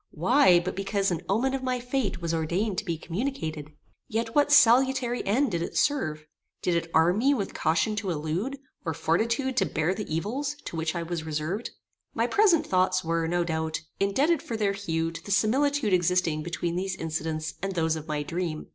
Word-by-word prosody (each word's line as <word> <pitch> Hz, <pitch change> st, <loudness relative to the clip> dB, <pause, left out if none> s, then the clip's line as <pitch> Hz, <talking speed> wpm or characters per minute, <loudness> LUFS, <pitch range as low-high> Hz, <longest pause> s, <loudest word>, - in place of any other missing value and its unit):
Why 185 Hz, -, +4 dB
but 175 Hz, +2 st, -4 dB
because 195 Hz, 0 st, 0 dB
an 170 Hz, -, -2 dB
omen 245 Hz, +7 st, +1 dB
of 270 Hz, -, -2 dB
my 255 Hz, -1 st, -1 dB
fate 245 Hz, -7 st, -2 dB
was 165 Hz, 0 st, -1 dB
ordained 180 Hz, +5 st, 0 dB
to 215 Hz, -, -7 dB
be 170 Hz, -3 st, -2 dB
communicated? 165 Hz, -, -4 dB, 0.4 s
Yet 225 Hz, +1 st, -2 dB
what 290 Hz, 0 st, +3 dB
salutary 250 Hz, -1 st, +5 dB
end 245 Hz, +5 st, +2 dB
did 170 Hz, -2 st, -1 dB
it -, -, -4 dB
serve? 155 Hz, -, 0 dB, 0.4 s
Did 180 Hz, -, +1 dB
it 170 Hz, 0 st, -1 dB
arm 170 Hz, +5 st, +3 dB
me 275 Hz, +4 st, +3 dB
with 200 Hz, -6 st, -3 dB
caution 160 Hz, +7 st, +1 dB
to 200 Hz, -2 st, -2 dB
elude, 170 Hz, -, -2 dB, 0.3 s
or 160 Hz, -3 st, -2 dB
fortitude 230 Hz, -, 0 dB
to -, -, +4 dB
bear 160 Hz, +3 st, 0 dB
the 210 Hz, -2 st, -6 dB
evils 255 Hz, -, -2 dB
to -, -, -6 dB
which 160 Hz, 0 st, -2 dB
I 170 Hz, -, -2 dB
was 165 Hz, -1 st, -4 dB
reserved? 160 Hz, +8 st, -3 dB, 0.5 s
My -, -, +2 dB
present 400 Hz, -6 st, +4 dB
thoughts 185 Hz, 0 st, +2 dB
were, 165 Hz, 0 st, 0 dB
no 175 Hz, +1 st, +1 dB
doubt, 160 Hz, -1 st, -2 dB, 0.2 s
indebted 275 Hz, +12 st, +2 dB
for 230 Hz, -, -4 dB
their 205 Hz, -2 st, +1 dB
hue 165 Hz, -4 st, -2 dB
to 165 Hz, -, -9 dB
the -, -, -10 dB
similitude 240 Hz, +4 st, +2 dB
existing 175 Hz, -3 st, +2 dB
between 170 Hz, +1 st, -3 dB
these 190 Hz, +1 st, -2 dB
incidents 160 Hz, -1 st, -3 dB
and 195 Hz, 0 st, -3 dB
those 160 Hz, -1 st, +1 dB
of 155 Hz, 0 st, -7 dB
my 150 Hz, -1 st, -2 dB
dream. 165 Hz, 0 st, -4 dB
185 Hz, 195 wpm, -27 LUFS, 165-235 Hz, 0.5 s, salutary